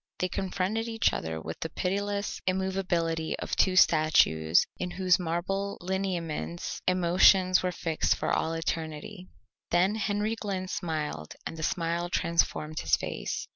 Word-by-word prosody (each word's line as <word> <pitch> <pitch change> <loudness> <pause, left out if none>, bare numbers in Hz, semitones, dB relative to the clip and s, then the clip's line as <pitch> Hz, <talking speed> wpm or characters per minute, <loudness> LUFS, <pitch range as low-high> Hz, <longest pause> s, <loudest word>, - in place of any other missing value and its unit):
They 185 - -1
confronted 190 +5 -2
each 225 0 +1
other 80 0 -3
with 80 +1 -7
the 160 - -3
pitiless 200 +4 -2
immovability 185 -4 0
of - - -3
two 185 -1 +3
statues 90 - +4
in 180 - -2
whose 185 0 +2
marble 185 +4 -2
lineaments 175 -3 -3
emotions 185 +1 +5
were 180 - -1
fixed 165 -2 0
for - - -1
all 160 - 0
eternity. 165 +3 -4 0.4
Then 180 +4 +3
Henry 215 0 -1
Glynn 195 -4 -4
smiled 155 - -4
and - - -5
the 160 - -7
smile 170 +1 -1
transformed 160 -3 0
his - - +3
face. - - -4
180 Hz, 135 wpm, -28 LUFS, 160-190 Hz, 0.4 s, emotions